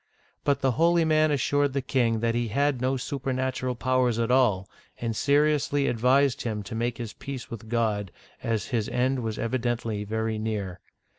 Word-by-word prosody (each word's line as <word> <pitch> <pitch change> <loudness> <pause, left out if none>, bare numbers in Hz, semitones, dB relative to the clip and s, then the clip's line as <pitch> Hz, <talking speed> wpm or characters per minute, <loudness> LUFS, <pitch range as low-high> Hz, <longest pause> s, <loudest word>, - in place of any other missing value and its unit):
But 140 -1 +1
the 135 -1 +3
holy 170 0 +4
man 155 0 +3
assured 145 0 +1
the 140 - 0
king 115 -4 +1
that 115 0 +1
he 120 0 0
had'no 135 +2 +1
super 135 +1 -3
natural 130 -1 -1
powers 130 -1 +1
at 115 +1 0
all, 110 -8 +3 0.3
and 115 -2 -2
seriously 145 +1 +2
advised 130 +3 +3
him 110 -3 -3
to 115 - -8
.make 115 +1 -1
his 115 -3 -6
peace 135 -3 -7
with 110 -1 -8
God, 110 -5 0 0.3
as 115 -2 -2
his 115 -3 -1
end 130 +2 +1
was 110 -3 -3
evidently 115 -3 -1
very 110 +1 -2
near. 100 -5 -3
120 Hz, 170 wpm, -26 LUFS, 110-135 Hz, 0.3 s, holy